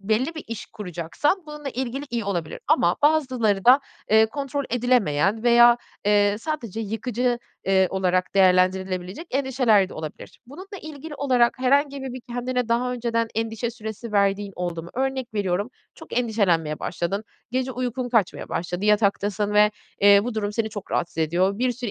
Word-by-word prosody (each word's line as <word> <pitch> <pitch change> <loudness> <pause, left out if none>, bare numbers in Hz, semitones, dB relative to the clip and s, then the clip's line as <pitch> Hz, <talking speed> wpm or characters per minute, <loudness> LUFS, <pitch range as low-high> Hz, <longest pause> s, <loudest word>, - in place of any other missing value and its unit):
belli 225 +10 0
bir 315 - -7
iş 230 -2 -6
kuracaksan 200 - -2
bununla 300 -2 -7
ilgili 260 +2 -4
iyi 235 -3 -2
olabilir. 175 -6 -3
Ama 170 +1 +3
bazıları 255 -10 +2
da, 260 +4 +7 0.3
eee, 220 +1 +6
kontrol 280 +3 -4
edilemeyen 220 -5 +1
veya, 240 0 +7 0.3
eee, 205 0 +3
sadece 230 - -4
yıkıcı, 240 +3 -1 0.3
eee, 190 -1 +3
olarak 185 -1 0
değerlendirilebilecek 185 - +2
endişeler 255 -7 +2
de - - -11
olabilir. 155 -1 -8
Bununla 375 - -10
ilgili 310 0 -8
olarak 255 -4 +2
herhangi 280 +2 +2
bir 265 -2 -5
bir 255 - -7
kendine 245 0 -2
daha 250 +2 +1
önceden 230 -1 -1
endişe 225 +1 -2
süresi 220 -1 -7
verdiğin 200 0 +1
oldu 175 -2 -3
mu? 170 - -11
Örnek 265 -2 -2
veriyorum, 200 +2 -1 0.2
çok - - -4
endişelenmeye 180 -10 +1
başladın. 195 +5 -3 0.3
Gece 260 +1 -1
uykun 250 0 -3
kaçmaya 225 -7 0
başladı. 175 +3 -3
Yataktasın 205 0 +1
ve, 210 0 +6 0.3
eee, 200 0 +7
bu 245 - -3
durum 210 -1 -2
seni 220 0 -1
çok 205 -2 -8
rahatsız 170 -1 -2
ediyor. 180 +5 +1
Bir 250 +1 +1
sürü 245 -2 -5
225 Hz, 160 wpm, -24 LUFS, 195-255 Hz, 0.3 s, da